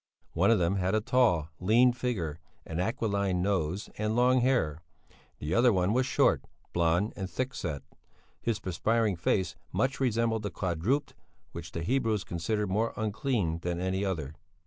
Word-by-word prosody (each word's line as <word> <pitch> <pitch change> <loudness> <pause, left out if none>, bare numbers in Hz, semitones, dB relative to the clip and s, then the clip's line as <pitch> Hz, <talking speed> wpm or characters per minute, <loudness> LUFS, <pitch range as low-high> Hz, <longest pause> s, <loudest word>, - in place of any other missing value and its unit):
One 90 +4 +3
of 115 - +5
them 90 +2 +1
had 95 +2 +1
a - - +3
tall, 105 -9 +2
lean 120 +6 +4
figure, 95 -11 -3 0.3
an 80 +1 -4
aquiline 100 -3 0
nose 95 -1 -1
and 110 +1 0
long 125 +1 +4
hair; 100 - +1 0.6
the 75 +4 -3
other 120 +3 +5
one 95 0 +2
was 130 +1 +2
short, - - +3 0.3
blond, 85 +5 +2
and 95 -2 -4
thick 130 +4 -3
set; 75 - -4 0.6
his 115 -2 -1
perspiring 105 +4 0
face 85 +1 0 0.2
much 135 +1 0
resembled 115 -3 +1
the 105 - -3
quadruped 100 - -1 0.4
which 85 -1 -8
the 85 - -3
Hebrews 110 -2 +1
consider 105 +5 -2
more 105 +4 0
unclean 110 - -1
than 85 0 -3
any 95 +2 -1
other. 80 -7 -2
100 Hz, 160 wpm, -29 LUFS, 85-115 Hz, 0.6 s, of